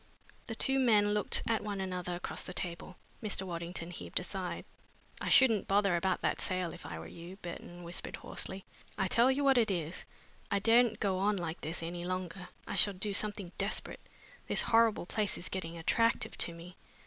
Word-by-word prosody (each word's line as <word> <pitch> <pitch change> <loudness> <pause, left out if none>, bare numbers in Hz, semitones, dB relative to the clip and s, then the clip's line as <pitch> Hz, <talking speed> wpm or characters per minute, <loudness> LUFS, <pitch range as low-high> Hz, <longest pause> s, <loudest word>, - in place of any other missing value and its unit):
The 225 - -1
two 270 +4 +3
men 210 -5 +4
looked 210 -1 +2
at 225 -1 +2
one 205 -2 -3
another 180 -2 -3
across 175 - -4
the - - -8
round 180 - -6
table. 175 +1 -3 0.3
Mr. 210 -3 -2
Waddington 170 -1 -5
heaved 180 - -2
a - - -5
sigh. - - -4 0.6
"I - - -1
shouldn't 230 -6 +6
bother 200 -2 +3
about 185 +1 +1
that - - 0
sale, 185 -2 -1
if - - -9
I - - -5
were 80 - -7
you," 170 - -9
Burton 175 0 -7
whispered 170 +1 -4
hoarsely. 190 0 -3 0.3
"I 190 - +1
tell 235 +6 +4
you 270 +2 +2
what 270 -2 +5
it 225 - +3
is, 170 -3 -2 0.5
I 200 - +2
daren't 230 +3 +4
go 190 -3 +1
on 205 +1 +2
like 170 -2 -4
this 165 +2 -3
any 175 +1 -4
longer. 180 0 -4 0.2
I - - -5
shall 205 - +5
do 200 +2 -2
something 205 -3 -1
desperate. 200 +2 -1 0.5
This - - +2
horrible 225 -4 +4
place 210 +2 0
is 175 - -1
getting 170 -3 -4
attractive 230 +7 +2
to - - 0
me! 175 +2 -11
190 Hz, 195 wpm, -33 LUFS, 175-215 Hz, 0.6 s, shouldn't